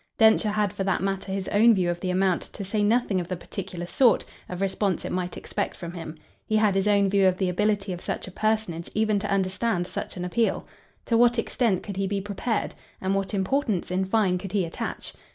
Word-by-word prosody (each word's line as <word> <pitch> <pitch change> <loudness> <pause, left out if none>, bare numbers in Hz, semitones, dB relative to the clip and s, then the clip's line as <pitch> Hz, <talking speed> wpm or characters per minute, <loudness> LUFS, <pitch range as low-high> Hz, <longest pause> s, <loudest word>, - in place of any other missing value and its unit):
Densher 220 -1 +5
had 210 -2 0
for 200 - -2
that 195 -1 0
matter 195 0 -2
his 195 -1 -3
own 225 +2 +5
view 185 -2 +1
of 175 - -4
the 185 - -3
amount, 185 -1 +2
to 200 - -6
say 210 +2 -1
nothing 210 -2 +2
of 170 - -6
the 185 - -2
particular 180 -1 -6
sort, 235 +5 +3 0.2
of 180 - -5
response 195 0 0
it - - -4
might 180 -1 -3
expect - - -3
from 170 -1 -7
him. 165 -2 -7 0.3
He 215 - 0
had 215 -2 +4
his 195 +1 +1
own 200 -1 +4
view 195 0 +4
of 185 -1 +2
the 185 -2 0
ability 205 +1 0
of 175 - -7
such - - -4
a - - -8
personage 215 -5 -1
even 215 -1 +2
to 205 0 -3
understand 190 0 0
such 185 - -6
an 180 - -3
appeal. 225 +5 0 0.4
To 230 -1 +2
what 240 0 +5
extent 230 -4 +1
could 200 -3 -6
he 195 0 0
be 200 0 -1
prepared, 205 +3 -2 0.3
and 190 +1 0
what 195 +1 -1
importance 200 - 0
in 190 +1 +1
fine 190 -3 +2
could 190 +1 -7
he 195 -4 +2
attach? 165 - -5
195 Hz, 225 wpm, -26 LUFS, 185-215 Hz, 0.4 s, Densher